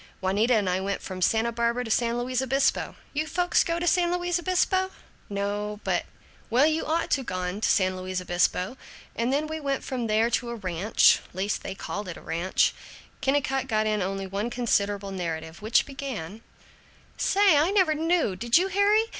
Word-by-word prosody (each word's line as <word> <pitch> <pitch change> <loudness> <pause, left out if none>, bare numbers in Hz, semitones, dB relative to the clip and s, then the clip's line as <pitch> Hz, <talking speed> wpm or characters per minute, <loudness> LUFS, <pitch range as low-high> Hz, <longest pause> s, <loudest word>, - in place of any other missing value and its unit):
Juanita 205 +6 +2
and 205 -3 +1
I 180 0 +1
went 200 +1 -3
from 185 -1 -6
Santa 225 +5 +2
Barbara 235 +1 0
to 225 - -5
San 235 +1 +1
Luis 250 +1 -1
Obispo. 270 +1 +1 0.2
You 305 +2 -1
folks 355 +2 +2
go 335 0 -1
to 345 - -2
San 350 0 +3
Luis 355 -1 0
Obispo?" 375 +1 +1 0.4
"No, 205 +1 -3
but - - -1 0.2
" - - -29
"Well 250 +5 +4
you 315 +1 0
ought 330 +2 0
to 270 - +2
gone 185 -1 -3
to - - +2
San 185 -2 +2
Luis 185 0 -3
Obispo. 180 +5 0 0.4
And 235 +2 0
then 290 +3 +1
we 315 +1 -4
went 275 -2 -2
from 245 -3 -3
there 220 +2 +2
to 240 0 0
a 235 - -4
ranch, 190 -1 +3 0.2
least 195 +3 -1
they 195 - -6
called 205 +1 -5
it 175 - -6
a - - -10
ranch 175 +3 +1 0.2
" - - -24
Kennicott 270 -1 0
got 215 0 +1
in 215 -1 0
only 195 +1 -2
one 200 +4 -3
considerable 205 -5 0
narrative, 165 -2 -5
which 220 +2 +3
began: 235 - -6 0.7
"Say, 395 -4 +4
I 300 +4 +4
never 375 -6 +3
knew 320 - +1
did 235 - +3
you, 375 +2 +2
Harry? 405 +3 +4
235 Hz, 195 wpm, -26 LUFS, 195-300 Hz, 0.7 s, Well